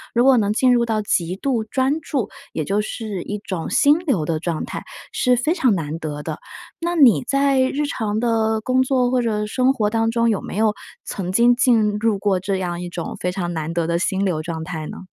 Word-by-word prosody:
如 240 - +4
果 265 -1 +6
能 210 -2 +1
进 250 +3 +4
入 240 -1 +3
到 220 -2 0
极 180 -4 0
度 230 +1 -1
专 265 +6 0
注， 275 -7 -2 0.2
也 155 - -2
就 200 +7 0
是 210 -3 -5
一 205 - -4
种 185 -5 -5
心 290 +3 +4
流 275 - 0
的 160 0 -1
状 165 -1 -3
态， - - -6 0.3
是 250 0 +2
非 250 +7 +1
常 265 - +2
难 160 -2 -4
得 150 -2 -5
的。 155 -1 -5 0.4
那 345 +1 -2
你 265 -7 +5
在 275 -1 +2
日 265 +3 +1
常 220 -6 -2
的 220 -2 +1
工 255 +3 +2
作 255 -2 +1
或 255 -1 +2
者 215 -3 -1
生 255 +5 +2
活 215 -6 0
当 225 +1 +1
中， 230 0 +2
有 215 - 0
没 - - -7
有 215 0 +2 0.3
曾 185 -2 -4
经 235 +4 +5
进 225 -5 +3
入 220 -1 +1
过 195 -1 +1
这 195 +2 -2
样 175 -2 -3
一 180 - -5
种 175 -1 -6
非 180 - -1
常 175 -3 -3
难 160 -1 -3
得 170 -1 -1
的 170 0 0
心 190 +2 0
流 175 -5 0
状 160 0 -5
态 160 -2 -5
呢？ - - -8
215 Hz, 245 characters per minute, -21 LUFS, 180-250 Hz, 0.4 s, 果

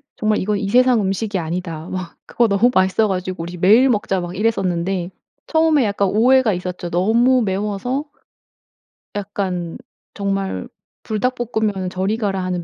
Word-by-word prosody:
정말 215 -1 +1
"이건 205 +2 0
이 200 -1 -3
세상 250 +1 +4
음식이 195 +1 -1
아니다." 165 -1 -4
막 185 -2 -5
그거 235 - +1
너무 210 +4 +3
맛있어 190 +3 +3
가지고 185 -3 -3
"우리 175 +1 -7
매일 220 +9 +5
먹자." 205 -4 0
막 175 +1 -5
이랬었는데 185 -4 -1 0.4
처음에 320 -3 +3
약간 200 -1 0
오해가 240 +2 +4
있었죠. 180 -1 -5
너무 230 +9 +3
매워서 210 +8 -2 1.1
약간 190 -4 -3 0.4
정말 195 +3 -2 0.4
불닭볶으면은 220 -4 -1
저리 190 +4 -1
가라 195 -4 -1
하는 180 -1 -2
200 Hz, 325 characters per minute, -20 LUFS, 185-225 Hz, 1.1 s, 매일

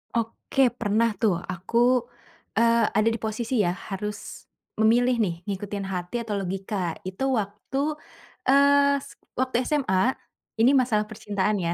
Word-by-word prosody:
Oke, 235 +3 +1
pernah 225 +1 +2
tuh. 215 -4 +4 0.2
Aku 180 +6 -3 0.8
eee, 230 0 +4
ada 215 +1 +4
di 225 - -1
posisi 225 +2 -4
ya, 175 - +1 0.2
harus 210 +1 -6 0.3
memilih 240 +3 +4
nih, 180 -5 0 0.2
ngikutin 200 0 -4
hati 180 +2 -4
atau 210 -3 -3
logika 190 -1 -3
itu 190 +7 -5 0.2
waktu 205 +5 -5 0.7
eee, 280 +1 +5
s - - -13 0.2
waktu 260 0 -2
SMA, 260 -5 +1 0.5
ini 245 +4 +6
masalah 230 -5 +2
percintaan 210 -1 -1
ya. 170 -3 -1
215 Hz, 135 wpm, -25 LUFS, 195-240 Hz, 0.8 s, ini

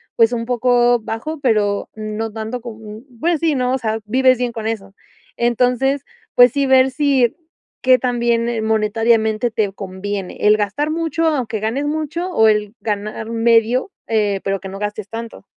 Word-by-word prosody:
pues, 230 +1 +4
un 230 -1 -2
poco 245 0 +3
bajo, 230 +9 -5
pero 210 -5 +1
no 215 +1 -4
tanto 220 +3 -5
como 225 -2 -9
m 215 0 -10 0.2
pues, 335 +1 +1
sí, 320 -3 +2
¿no?, 250 0 0
o - - +2
sea, 220 -3 -2
vives 255 +3 +3
bien 245 -2 -1
con 220 -2 -4
eso. 195 -3 -5 0.4
Entonces, 250 +3 +1 0.3
pues, 245 -1 +7
sí, 280 -1 +1
ver 265 0 +4
si 270 -4 +2 0.5
qué 255 0 +5
tan 245 -1 -1
bien 235 -1 0
monetariamente 220 +1 +1
te 210 -3 0
conviene 195 0 -5
el 210 0 +6
gastar 215 +9 -1
mucho, 330 0 -1
aunque 245 -8 -1
ganes 250 +7 -1
mucho, 310 +3 -2
o 220 -8 +4
el 210 0 0
ganar 215 +1 -4
medio, 230 - +2 0.2
eh, 205 -3 0
pero 195 -1 -1
que 195 - -8
no 195 +1 -8
gastes 210 -1 -4
tanto. 225 -2 -7
230 Hz, 175 wpm, -19 LUFS, 215-255 Hz, 0.5 s, pues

